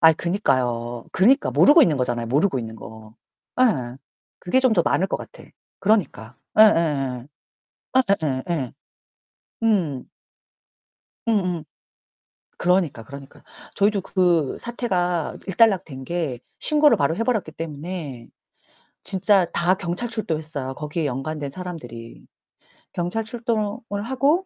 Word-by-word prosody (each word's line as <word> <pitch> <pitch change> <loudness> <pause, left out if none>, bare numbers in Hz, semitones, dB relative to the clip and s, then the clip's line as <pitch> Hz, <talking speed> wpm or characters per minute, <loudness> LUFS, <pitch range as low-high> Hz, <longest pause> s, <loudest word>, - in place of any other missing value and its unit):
아 160 -1 +8
그니까요. 125 - -1
그니까 255 +9 +4
모르고 295 +4 +7
있는 160 - +3
거잖아요 120 -2 -1
모르고 140 - +1
있는 110 -2 -6
거. 110 0 -12 0.5
예. 130 - +2 0.4
그게 180 +8 +1
좀 255 -3 +3
더 180 -5 +3
많을 190 - +2
것 - - -2
같아. - - -12 0.4
그러니까. 160 - 0 0.2
예 215 - +11
예 - - +9
예. 140 - 0 0.7
예 260 - +6 0.2
예 130 -3 -1
예 175 - +2
예. 130 -6 -4 0.9
응. 175 - 0 1.2
응 230 - +3
응. 175 -3 -2 1.0
그러니까, 175 -9 +1
그러니까. 140 +2 -12 0.3
저희도 200 -1 +2
그 175 -7 +1
사태가 180 -9 -1
일단락된 190 - +2
게 160 -6 -3 0.2
신고를 300 -1 +4
바로 145 +4 +1
해버렸기 225 -8 -1
때문에 155 -5 -6 0.7
진짜 190 -1 +3
다 175 +2 +1
경찰 185 +4 -3
출동했어요. 155 - -3
거기에 150 +2 -3
연관된 140 +2 -3
사람들이. 135 -9 -9 0.7
경찰 180 +6 -2
출동을 225 -2 -3
하고 280 - +1
170 Hz, 260 characters per minute, -23 LUFS, 135-205 Hz, 1.2 s, 예